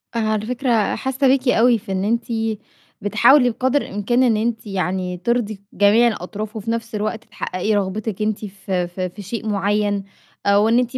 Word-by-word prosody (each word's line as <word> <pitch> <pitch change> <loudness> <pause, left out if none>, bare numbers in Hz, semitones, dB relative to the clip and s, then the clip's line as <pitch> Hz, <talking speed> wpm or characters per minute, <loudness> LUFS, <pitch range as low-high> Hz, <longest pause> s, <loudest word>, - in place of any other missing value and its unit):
أنا 220 -2 +1
على 215 0 -2
فكرة 240 -3 +1
حاسّة 265 +1 0
بيكِ 260 0 +2
أو 240 0 +4
في 195 - -9
إن 190 0 -1
أنتِ 230 +3 +1 0.8
بتحاولي 240 +6 +5
بقدر 260 +4 +1
الإمكان 240 +5 0
إن 230 -4 +3
أنتِ 225 0 -2
يعني 185 -2 -2
ترضي 215 +1 -1
جميع 210 +4 +5
الأطراف 215 +1 -4
وفي 220 +1 -3
نَفْس 230 0 -3
الوقت 215 +1 -2
تحققي 185 +4 -2
رغبتِك 205 +1 -2
أنتِ 215 0 -1
ف 195 0 -10
ف 180 0 -2
في 185 +2 -4
شيء 220 +3 -5
معيّن 205 0 0 0.4
أو 205 +2 +4
إن 235 - +4
أنتِ 250 +1 -1
215 Hz, 175 wpm, -21 LUFS, 200-235 Hz, 0.8 s, بتحاولي